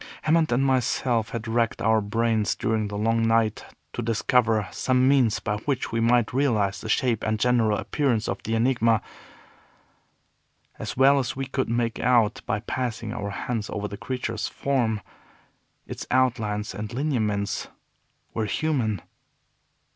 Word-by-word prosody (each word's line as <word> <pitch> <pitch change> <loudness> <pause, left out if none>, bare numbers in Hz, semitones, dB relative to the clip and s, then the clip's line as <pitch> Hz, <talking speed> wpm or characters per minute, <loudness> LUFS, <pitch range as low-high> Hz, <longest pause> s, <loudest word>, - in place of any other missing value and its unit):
Hammond 160 -1 +3
and 130 +3 +2
myself 125 -3 +1
had 115 -1 -5
racked 115 0 0
our 110 +1 +3
brains 110 0 0
during 110 -1 -1
the 100 0 -5
long 115 +2 +1
night 115 -1 +1 0.3
to - - -3
discover 115 -2 +2
some 130 0 +2
means 130 -6 +3
by 105 -1 -2
which 130 +4 -2
we 115 - 0
might 115 -1 +2
realize 110 -8 +1
the 110 - -6
shape 115 -2 +1
and 110 0 0
general 115 -3 +3
appearance 125 -7 0
of 95 - -3
the 115 +2 -2
Enigma. 115 -2 +2 1.8
As - - -5
well 140 +2 +6
as 130 - -2
we 135 0 -3
could 130 -1 -2
make 115 0 -1
out 115 -3 +3
by 105 - -1
passing 115 -3 -3
our 105 -4 -4
hands 110 +2 -3
over 105 0 -3
the 100 - -7
creature's 115 -1 -3
form, 120 -6 -1 0.8
its - - -7
outlines 115 -5 0
and 105 +1 -5
lineaments 110 -7 -1 0.7
were 110 - -1
human. 110 - -1
115 Hz, 145 wpm, -25 LUFS, 110-125 Hz, 1.8 s, well